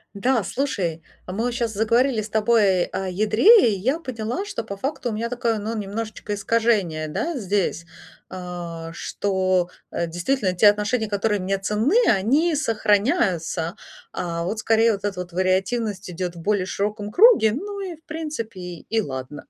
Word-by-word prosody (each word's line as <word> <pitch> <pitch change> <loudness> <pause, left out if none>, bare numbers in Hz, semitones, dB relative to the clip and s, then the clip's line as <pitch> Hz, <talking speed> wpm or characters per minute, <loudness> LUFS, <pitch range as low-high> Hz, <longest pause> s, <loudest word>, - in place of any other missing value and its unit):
Да, 235 +2 +1
слушай, 185 - -2 0.2
а, - - -7
мы 220 +4 -2
вот 245 - -1
щас 235 -2 -1
заговорили 230 +3 +2
с 215 - -7
тобой 210 -4 +3
о 190 - -4
ядре, 215 - +5
и 200 - -1
я 260 - 0
поняла, 250 - -4
что 405 0 -4
по 200 - -6
факту 265 +2 -3
у - - -3
меня 230 +2 -2
такое, 235 -3 -1
ну, 220 +2 -3
немножечко 210 +1 -4
искажение, 205 -7 +1
да, 325 - -2
здесь. 195 -5 -1 0.4
А 175 -3 -6
что, 185 -1 0 0.2
э, 170 - -2
действительно 185 +5 -1
те 195 +4 +5
отношения, 210 +2 0
которые 205 0 0
мне 195 +1 -1
ценны, 210 - +1
они 275 - +3
сохраняются. 205 - +1 0.4
А, 170 -1 -3
вот 210 +5 -3
скорее 225 +1 +3
вот 200 0 -5
эта 200 -3 -2
вот 180 0 -6
вариативность 190 +2 0
идёт 180 0 -4
в 170 - -9
более 205 0 +1
широком 205 +2 -3
круге, 410 - +6
ну, 400 - -5
и 370 -3 -5
в 320 - -27
принципе 305 - -5
и 180 +5 -3
ладно. 130 -3 -6
210 Hz, 165 wpm, -23 LUFS, 185-235 Hz, 0.4 s, круге